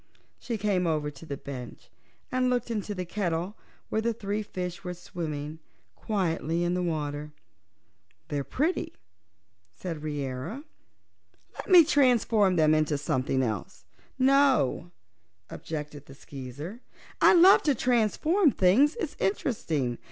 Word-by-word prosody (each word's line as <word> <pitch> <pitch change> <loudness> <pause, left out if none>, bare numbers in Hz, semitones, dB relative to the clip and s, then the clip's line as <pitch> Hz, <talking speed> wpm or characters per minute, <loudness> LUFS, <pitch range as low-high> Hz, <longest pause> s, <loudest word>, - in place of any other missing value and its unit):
She 235 -2 -4
came 195 -4 0
over 150 -2 -1
to 160 +3 -13
the 140 - -4
bench 125 -4 -9 0.4
and 255 0 +1
looked 245 -1 -1
into 210 -2 -3
the 180 -1 -4
kettle, 175 0 -2 0.3
where 220 - 0
the 230 +1 0
three 205 -1 -3
fishes 185 -2 -6
were 180 -1 -5
swimming 155 -3 -6 0.4
quietly 170 -5 -1
in 175 0 0
the 180 - 0
water. 150 -3 -3 1.0
"They're 145 -2 -2
pretty," 305 - -1 0.8
said 165 - -6
Reera. 145 - -4 0.9
"Let - - -9
me 360 -3 +9
transform 240 - +3
them 155 -2 +4
into 155 -1 +1
something 130 -1 0
else." 110 -6 -4 0.3
"No," 265 - +3 0.6
objected 150 -2 -7
the 135 - -12
Skeezer. 140 - -9 0.4
"I - - +7
love 365 +3 +7
to 290 -3 +2
transform 255 - +2
things; 240 +8 +3
it's 375 -11 -3
so - - -6
interesting. 160 - -1
180 Hz, 130 wpm, -27 LUFS, 150-235 Hz, 1.0 s, me